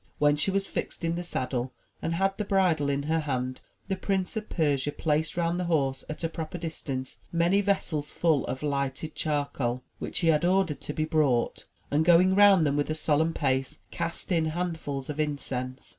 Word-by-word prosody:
When 145 Hz, 0 st, +4 dB
she 150 Hz, -, 0 dB
was 195 Hz, 0 st, 0 dB
fixed -, -, -4 dB
in 165 Hz, -, +1 dB
the 175 Hz, +1 st, -3 dB
saddle 130 Hz, -5 st, -2 dB, 0.3 s
and 165 Hz, -, -1 dB
had 195 Hz, +2 st, +1 dB
the 210 Hz, -, -2 dB
bridle 180 Hz, -8 st, +2 dB
in 140 Hz, 0 st, 0 dB
her 160 Hz, +2 st, +1 dB
hand, 130 Hz, -4 st, -2 dB, 0.3 s
the 190 Hz, -, 0 dB
Prince 190 Hz, 0 st, -1 dB
of 220 Hz, -1 st, -4 dB
Persia 145 Hz, -3 st, +1 dB
placed 155 Hz, +1 st, 0 dB
round 170 Hz, +1 st, +1 dB
the 180 Hz, -, -1 dB
horse, 135 Hz, -6 st, +1 dB
at 155 Hz, -, -6 dB
a -, -, +2 dB
proper 160 Hz, +1 st, -5 dB
distance, 140 Hz, -6 st, -5 dB
many 175 Hz, +4 st, +3 dB
vessels 180 Hz, -7 st, 0 dB
full 160 Hz, -5 st, +2 dB
of 130 Hz, -, -4 dB
lighted 140 Hz, +1 st, -2 dB
charcoal, 140 Hz, -5 st, -1 dB, 0.2 s
which -, -, -3 dB
he 165 Hz, -, +3 dB
had 155 Hz, 0 st, +3 dB
ordered 180 Hz, -3 st, +2 dB
to 150 Hz, -, -5 dB
be 155 Hz, -, 0 dB
brought, 150 Hz, -7 st, +1 dB, 0.3 s
and 150 Hz, +2 st, +3 dB
going 175 Hz, +3 st, +6 dB
round 195 Hz, -4 st, +7 dB
them 140 Hz, -1 st, +1 dB
with 145 Hz, -, 0 dB
a 155 Hz, -, 0 dB
solemn 160 Hz, +1 st, +1 dB
pace, 135 Hz, +1 st, 0 dB
cast 170 Hz, +3 st, -4 dB
in 165 Hz, -3 st, +3 dB
handfuls 160 Hz, -5 st, -3 dB
of 150 Hz, 0 st, -5 dB
incense. 135 Hz, -3 st, -3 dB
155 Hz, 195 wpm, -28 LUFS, 140-175 Hz, 0.3 s, round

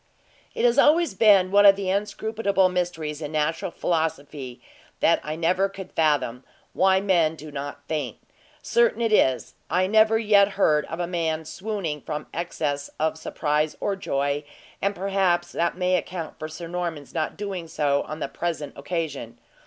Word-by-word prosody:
It -, -, +1 dB
has 240 Hz, +3 st, +4 dB
always 320 Hz, -, +4 dB
been 195 Hz, -3 st, +5 dB
one 205 Hz, 0 st, +6 dB
of 200 Hz, -1 st, +8 dB
the 195 Hz, -1 st, -2 dB
inscrutable 200 Hz, -1 st, +1 dB
mysteries 165 Hz, -4 st, -3 dB
in 150 Hz, -1 st, -5 dB
natural 155 Hz, +3 st, 0 dB
philosophy 145 Hz, -7 st, -3 dB, 0.4 s
that -, -, +4 dB
I 155 Hz, +1 st, -4 dB
never 180 Hz, +4 st, +1 dB
could 195 Hz, -1 st, -9 dB
fathom, 140 Hz, -6 st, +1 dB, 0.3 s
why 190 Hz, 0 st, +4 dB
men 175 Hz, -5 st, +2 dB
do 155 Hz, 0 st, -10 dB
not 145 Hz, 0 st, -7 dB
faint. 145 Hz, -7 st, -3 dB, 0.5 s
Certain 235 Hz, -1 st, +2 dB
it 225 Hz, -2 st, +1 dB
is, 130 Hz, -10 st, +2 dB, 0.2 s
I 180 Hz, +2 st, +2 dB
never 220 Hz, +2 st, +4 dB
yet 205 Hz, -2 st, +4 dB
heard 150 Hz, -6 st, +3 dB
of 165 Hz, -, -6 dB
a 175 Hz, -, 0 dB
man 165 Hz, -2 st, -2 dB
swooning 180 Hz, -3 st, -4 dB
from 150 Hz, +2 st, -5 dB
excess 150 Hz, -4 st, -3 dB
of 160 Hz, +1 st, +1 dB
surprise 155 Hz, -1 st, -1 dB
or 200 Hz, -, -1 dB
joy, 145 Hz, -5 st, -1 dB, 0.4 s
and 200 Hz, +1 st, 0 dB
perhaps 190 Hz, -2 st, +1 dB
that 170 Hz, +1 st, -1 dB
may 185 Hz, 0 st, +2 dB
account 175 Hz, -2 st, -4 dB
for 155 Hz, -, -4 dB
Sir 165 Hz, +2 st, -8 dB
Norman's 170 Hz, -4 st, -4 dB
not 160 Hz, -2 st, -2 dB
doing 195 Hz, -5 st, -5 dB
so 145 Hz, -3 st, +1 dB
on 155 Hz, -, -6 dB
the 140 Hz, -, -2 dB
present 155 Hz, -1 st, -4 dB
occasion. 145 Hz, -5 st, -4 dB
170 Hz, 165 wpm, -25 LUFS, 150-195 Hz, 0.5 s, of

